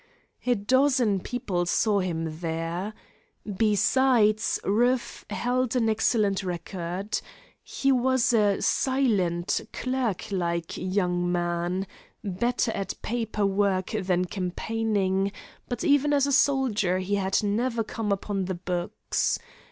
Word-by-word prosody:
A 245 - +4
dozen 250 -1 +2
people 185 -6 -2
saw 205 +3 +2
him 165 -4 -3
there. 170 +5 -3 0.5
Besides, 215 +2 +2
Rueff 240 +5 +1
held 250 0 0
an 230 -3 +2
excellent 215 -2 +2
record. 180 +2 -4 0.4
He 275 - 0
was 260 -1 +2
a 205 -3 +3
silent, 205 -11 +1
clerk 255 -7 -2
like 170 -3 -2
young 180 -2 0
man, 175 +2 -1 0.4
better 225 +4 0
at 195 -3 -4
"paper 225 -3 -1
work" 195 -1 +1
than 180 -1 0
campaigning, 195 +1 -1 0.4
but 245 - -3
even 290 -2 +3
as 280 -1 +3
a 285 - 0
soldier 255 -10 +2
he 185 +2 -3
had 195 0 +1
never 230 +3 0
come 215 -1 -3
upon 195 -1 -1
the 185 0 -3
books. 175 0 -1
205 Hz, 115 wpm, -26 LUFS, 185-240 Hz, 0.5 s, A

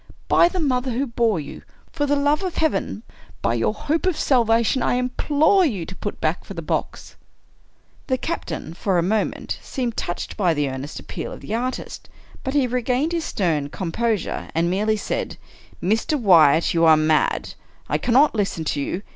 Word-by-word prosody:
By 340 - +5
the 370 - -3
mother 260 -4 0
who 265 +4 0
bore 230 -6 +1
you 145 - -8 0.2
— - - -32
for 290 -1 -1
the 290 - +2
love 290 +3 +2
of 370 -3 -3
Heaven 315 -8 -1 0.2
— 95 -5 -25
by 115 - +2
your 115 - +1
hope 310 +11 -1
of 360 -4 +1
salvation, 235 -1 +2
I - - +1
implore 295 +8 +2
you 205 - -1
to 185 - -9
put 205 - -5
back 160 +4 -1
for 195 - -9
the 165 - -5
box! - - -3 0.5
" - - -35
The 260 - +1
captain, 165 - -4
for 185 +1 0
a 170 - +2
moment, 210 +4 -1
seemed 245 -4 -3
touched 175 - -4
by 180 -5 +2
the 145 - +1
ear 130 -1 -4
nest 145 +3 -7
appeal - - -6
of - - -9
the - - -6
artist, 250 +3 -4 0.3
but 265 +2 -3
he 280 -3 +4
regained 250 +5 0
his 335 -2 -1
stern 155 -7 -1
com 170 +2 -4
posure, 225 -2 -1
and 170 +1 +2
merely 215 +3 +1
said: - - -3 0.2
" - - -21
Mr. 225 - +1
Wyatt, 165 - +5
you 165 -1 +2
are 160 -1 +7
mad. 155 0 +1 0.3
I - - 0
cannot 270 +5 +4
listen 200 -6 -1
to 150 -2 -1
you. 180 +7 -3
220 Hz, 200 wpm, -22 LUFS, 165-270 Hz, 0.5 s, are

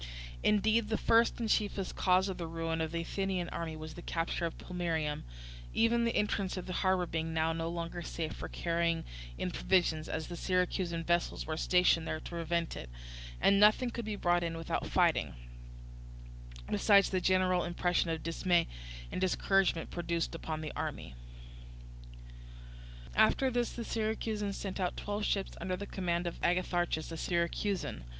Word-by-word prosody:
Indeed 215 +1 +3
the 220 - +1
first 230 +1 +3
and 230 - -1
chiefest 205 -3 0
cause 185 +1 +3
of 190 -2 -4
the 170 - -3
ruin 165 0 -2
of 160 -1 -2
the 170 0 -1
Athenian 185 0 -2
army 165 -2 -4
was 155 0 -7
the 175 - -9
capture 170 0 -1
of 165 - -8
Plemmyrium; 165 -4 -2 0.5
even 235 +1 +3
the 230 - 0
entrance 200 -2 0
of 185 - -4
the 185 - -5
harbour 185 -1 +2
being 165 -1 -3
now 160 0 +2
no 165 0 -2
longer 170 0 -4
safe 165 -1 -4
for - - -6
carrying 170 -1 0 0.3
in - - -2
provisions, 155 - +1
as 160 -1 -2
the 175 - -6
Syracusan 180 -1 0
vessels 170 +1 0
were 155 - -2
stationed 175 -1 +3
there 155 - -2
to - - -9
prevent 170 0 -1
it, - - -7 0.5
and 200 0 +5
nothing 215 +4 +5
could 235 - -4
be 215 -1 -2
brought 175 -3 +2
in 165 -1 -2
without 165 - -2
fighting; - - +2 1.3
besides 200 -2 +4
the 185 -1 +1
general 185 -1 +3
impression 175 0 +1
of 160 -1 -2
dismay 170 +1 +2 0.5
and - - -3
discouragement 190 -2 +2
produced 170 -1 -2
upon 160 -1 -4
the 155 - -5
army. - - -4 2.0
After 265 - +4
this 240 -1 0
the 235 - -4
Syracusans 215 -2 -2
sent 195 -1 -4
out 180 -2 -1
twelve 205 +1 -2
ships 195 -1 0
under 185 -1 -1
the 200 - -5
command 175 -3 -1
of 170 - -4
Agatharchus, 175 -2 0
a 165 - -5
Syracusan. 170 - -1
175 Hz, 165 wpm, -32 LUFS, 165-195 Hz, 2.0 s, and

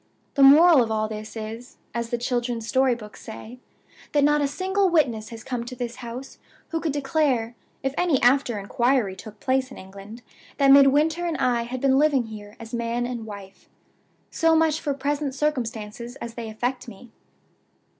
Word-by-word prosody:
The 280 - +1
moral 300 +2 +8
of 230 - 0
all 215 0 0
this 215 +1 -7
is 225 +4 -8 0.2
(as 235 -1 -3
the 240 - -1
children's 240 -1 -2
storybooks 240 -5 0
say), 225 +2 -10 0.5
that 290 -1 +3
not 295 +1 +3
a 285 - +2
single 380 +6 0
witness 240 -11 +1
has 225 -2 -9
come 245 -3 -3
to 250 +1 -7
this 245 -1 -5
house 250 +2 -8 0.3
who 325 - -2
could 320 -2 -1
declare, 270 -5 0 0.3
if 270 0 -1
any 340 -7 +2
after 245 -2 +3
inquiry 230 0 0
took 210 +2 -11
place 260 0 0
in 260 - -11
England, 200 +5 -11 0.3
that 275 -1 +5
Midwinter 295 +5 +5
and 330 - -2
I 240 -2 +1
had 250 +1 -5
been 270 -1 +3
living 290 -4 +3
here 210 -2 -10
as 230 +1 -10
man 235 +1 -1
and 240 -3 -5
wife. 200 -2 -11 0.6
So 325 0 +3
much 320 -1 +2
for 285 -2 -2
present 280 0 -2
circumstances 235 -5 -3
as 235 -3 -7
they 230 -1 -6
affect 245 +4 -3
me. 230 +2 -12
245 Hz, 175 wpm, -24 LUFS, 225-280 Hz, 0.6 s, moral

